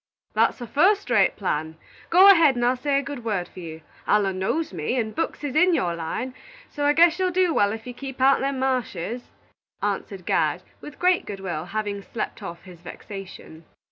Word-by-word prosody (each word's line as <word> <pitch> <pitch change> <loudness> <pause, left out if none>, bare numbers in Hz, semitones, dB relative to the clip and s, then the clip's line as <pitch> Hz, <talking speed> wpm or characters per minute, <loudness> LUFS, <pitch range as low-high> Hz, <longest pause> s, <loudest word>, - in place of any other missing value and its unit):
"That's - - +2
a - - -4
fust 365 - +2
rate 205 -5 +4
plan. 160 -4 -3 0.3
Go 375 +3 +8
ahead, 325 -8 +5
and 240 0 0
I'll 250 +1 +3
say 275 +2 0
a 280 - 0
good 275 -4 -7
word 200 -6 -2
for - - -13
you. 160 -2 -8 0.3
Allen 195 -3 +2
knows 300 +9 -1
me, 170 +9 -2
and 220 -3 -1
books 325 - -3
is 285 -2 -3
in 355 +2 +5
your 175 - 0
line, 170 +10 -4 0.4
so 290 -1 -2
I 290 - +4
guess 335 +3 +5
you'll 370 -1 +2
do 360 -1 +2
wal 205 -6 +3
if 225 +1 -6
you 250 - -7
keep 270 +1 -8
out'n 270 +1 +4
the 275 +1 0
mashes," 250 -5 -2 0.5
answered 195 -2 -3
Gad, - - +1 0.2
with 295 - -10
great 360 0 +2
good 200 -1 -6
will, 175 -4 -4
having 205 0 -3
slept 220 +2 -5
off 170 -4 -8
his 180 -3 -13
vexation. 185 -3 -10
240 Hz, 205 wpm, -24 LUFS, 195-290 Hz, 0.5 s, Go